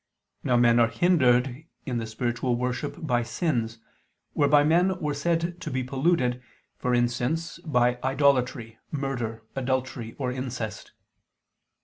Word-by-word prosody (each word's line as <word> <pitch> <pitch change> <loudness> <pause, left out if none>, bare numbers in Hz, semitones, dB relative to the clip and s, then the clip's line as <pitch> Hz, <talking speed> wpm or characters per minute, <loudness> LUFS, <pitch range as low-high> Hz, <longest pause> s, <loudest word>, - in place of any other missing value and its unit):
Now 125 - +2
men 120 0 +5
are 115 - +5
hindered 130 -1 +2 0.2
in 125 -3 -2
the 115 - -4
spiritual 120 +2 -1
worship 125 +3 -2
by 120 -4 +2
sins, 120 -2 -1 0.6
whereby 145 0 +4
men 180 +5 +3
were 150 -4 -1
said 170 +4 -1
to - - -4
be 130 0 -1
polluted, 130 -2 +1 0.4
for 125 0 +1
instance, 125 +8 -1
by 125 -7 +1
idolatry, 130 -4 +1
murder, 125 -6 -3
adultery, 130 -3 -2
or 130 -3 -2
incest. 125 -4 -5
125 Hz, 125 wpm, -26 LUFS, 120-145 Hz, 0.6 s, men